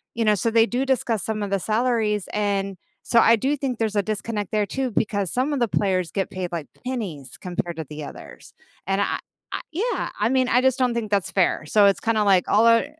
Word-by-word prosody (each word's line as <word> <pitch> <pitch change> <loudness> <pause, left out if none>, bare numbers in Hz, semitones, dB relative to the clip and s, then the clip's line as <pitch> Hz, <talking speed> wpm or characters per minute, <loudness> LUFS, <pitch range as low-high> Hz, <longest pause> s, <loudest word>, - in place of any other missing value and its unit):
you 230 -1 0
know, 215 - +5
so 230 - 0
they 225 0 +5
do 245 +3 -1
discuss 235 -5 0
some 215 -1 -2
of 200 - -4
the 195 - +1
salaries, 215 -2 0
and 200 -2 -1 0.3
so 235 - +3
I 230 +1 +6
do 275 +6 0
think 260 -4 -3
there's 220 -2 -1
a 205 - +2
disconnect 215 0 -3
there 210 -2 +1
too, 265 +3 -2
because 200 -4 -1
some 260 +4 0
of 280 - -1
the 240 - +2
players 185 -4 0
get 195 -1 -2
paid, 185 -2 -5
like, 165 -4 -4 0.2
pennies 180 - -5
compared 175 -2 -4
to 160 - -4
the 150 0 -7
others, - - -11 0.3
and 195 +1 +1
I - - 0 0.3
I - - -3
Yeah, 440 +10 -1
I - - +2
mean, 260 0 +2
I 250 - +4
just 265 0 +2
don't 250 -2 +2
think 230 -2 -3
that's 195 -2 +1
fair, 180 -4 +1
so, 205 +2 +5
it's 200 - +2
kinda, 220 -2 +1
like, 195 -3 +3
all 220 +3 +5
are 230 0 +5
215 Hz, 235 wpm, -23 LUFS, 195-235 Hz, 0.3 s, I